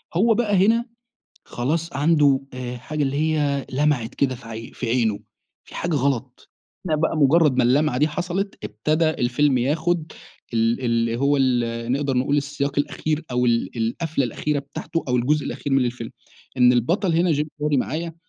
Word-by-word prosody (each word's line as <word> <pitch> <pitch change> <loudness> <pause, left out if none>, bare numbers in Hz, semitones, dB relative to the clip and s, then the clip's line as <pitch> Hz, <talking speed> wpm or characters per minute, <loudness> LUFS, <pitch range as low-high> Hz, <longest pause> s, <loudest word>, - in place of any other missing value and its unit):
هو 225 +6 +4
بقى 210 -3 +1
هنا 230 +2 +2 0.6
خلاص 160 +7 -2
عنده 145 -2 +3
آآ، 125 -1 -5
حاجة 150 +5 -4
اللي 135 0 -1
هي 150 -2 0
لمعت 135 -4 0
كده 135 -2 0
في 120 -1 -13
ع 115 0 -7
في 125 - -5
عينه 115 -4 +1 0.4
فيه - - -12
حاجة 170 -1 -1
غلط 130 -2 -2 0.4
لقي 155 -3 +1
بقى 160 - 0
مجرّد 150 -1 +4
ما 125 - +5
اللمعة 130 +1 +2
دي 150 +3 +3
حصلت 180 +5 -3
ابتدى 155 +8 0
الفيلم 130 0 +1
ياخد 160 +5 0 0.4
ال 115 +2 +1
اللي 115 -1 0
هو 140 +3 +2
ال 120 -3 0
نقدر 135 -1 0
نقول 140 +3 +1
السياق 145 0 -2
الأخير 155 +2 -1
أو 125 0 +1
ال 115 -1 +1
القفلة 135 +6 -1
الأخيرة 145 +5 -2
بتاعته 145 +3 -5
أو 125 - +2
الجزء 140 +4 +1
الأخير 145 - -4
من 135 -1 +3
الفيلم، 120 -1 -4 0.5
إن 125 0 +6
البطل 165 - +1
هنا 170 +1 +3
Jim 150 +1 0 0.2
Carrey 150 -1 +2
معايا 160 +5 -2
140 Hz, 170 wpm, -22 LUFS, 125-155 Hz, 0.6 s, إن